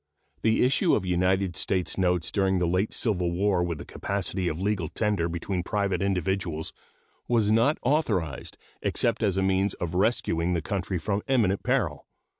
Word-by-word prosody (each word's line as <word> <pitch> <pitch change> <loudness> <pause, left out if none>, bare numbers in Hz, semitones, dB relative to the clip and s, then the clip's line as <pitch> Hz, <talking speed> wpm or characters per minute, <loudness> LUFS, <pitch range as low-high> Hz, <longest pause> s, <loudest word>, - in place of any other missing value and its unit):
The 110 0 +3
issue 130 +2 +3
of 95 - -1
United 90 0 +1
States 90 +2 -1
notes 90 -3 +1
during 95 -2 +2
the 90 - +1
late 90 +5 +1
civil 90 -7 0
war 95 +1 +1
with 85 -2 -1
the 70 - -8
capacity 95 -2 -2
of 80 0 -2
legal 95 -3 0
tender 100 -5 0
between 90 +2 -2
private 100 0 -1
individuals 95 -4 -1 0.5
was 110 -3 +2
not 115 +7 +3
authorized 105 - 0 0.2
except 115 -1 0
as 100 -4 +1
a 95 - +2
means 95 +1 +1
of 85 -1 -4
rescuing 90 -4 +1
the 85 - 0
country 95 +1 -2
from 100 +5 -1
imminent 110 -8 +2
peril. - - -1
95 Hz, 165 wpm, -27 LUFS, 90-105 Hz, 0.5 s, The